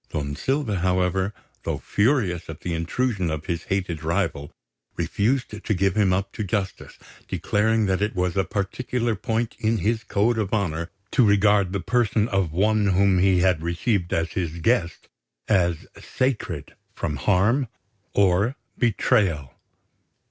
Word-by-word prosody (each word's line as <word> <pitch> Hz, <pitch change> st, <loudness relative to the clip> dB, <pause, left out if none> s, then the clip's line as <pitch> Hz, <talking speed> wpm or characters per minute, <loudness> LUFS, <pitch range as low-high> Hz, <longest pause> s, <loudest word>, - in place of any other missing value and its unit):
Don 70 Hz, -1 st, -3 dB
Silva, 135 Hz, -, -1 dB
however, 95 Hz, +2 st, +1 dB, 0.3 s
though -, -, -2 dB
furious 105 Hz, -, 0 dB
at 80 Hz, -, -8 dB
the 90 Hz, -, -3 dB
intrusion 95 Hz, +3 st, -1 dB
of 80 Hz, 0 st, -4 dB
his 85 Hz, -1 st, -3 dB
hated 90 Hz, -5 st, -2 dB
rival, 80 Hz, -4 st, -1 dB, 0.5 s
refused 110 Hz, -1 st, -1 dB
to 110 Hz, -, 0 dB
give 95 Hz, 0 st, +1 dB
him 105 Hz, -3 st, +3 dB
up 95 Hz, +2 st, 0 dB
to 110 Hz, -, -4 dB
justice, 100 Hz, -1 st, -3 dB, 0.3 s
declaring 110 Hz, +1 st, +1 dB
that 95 Hz, -1 st, 0 dB
it 105 Hz, 0 st, 0 dB
was 90 Hz, 0 st, 0 dB
a 95 Hz, -, +2 dB
particular 115 Hz, +4 st, -2 dB
point 110 Hz, +3 st, -2 dB
in 110 Hz, +1 st, +1 dB
his 110 Hz, +3 st, 0 dB
code 110 Hz, +3 st, +1 dB
of 105 Hz, 0 st, 0 dB
honour 85 Hz, -5 st, -1 dB, 0.2 s
to 125 Hz, -, +4 dB
regard 100 Hz, -2 st, +4 dB
the 100 Hz, -, -1 dB
person 115 Hz, 0 st, +1 dB
of 95 Hz, -5 st, 0 dB
one 105 Hz, +4 st, +2 dB
whom 95 Hz, 0 st, +3 dB
he 95 Hz, -1 st, +4 dB
had 90 Hz, -3 st, +2 dB
received 85 Hz, +2 st, -1 dB
as 85 Hz, +1 st, 0 dB
his 85 Hz, -3 st, -3 dB
guest 85 Hz, -2 st, 0 dB, 0.4 s
as 85 Hz, -5 st, +1 dB
sacred 130 Hz, -2 st, -2 dB, 0.2 s
from 75 Hz, -, -3 dB
harm 105 Hz, -, +2 dB, 0.5 s
or 100 Hz, +5 st, +3 dB, 0.2 s
betrayal. 95 Hz, -, +1 dB
100 Hz, 150 wpm, -24 LUFS, 90-110 Hz, 0.5 s, to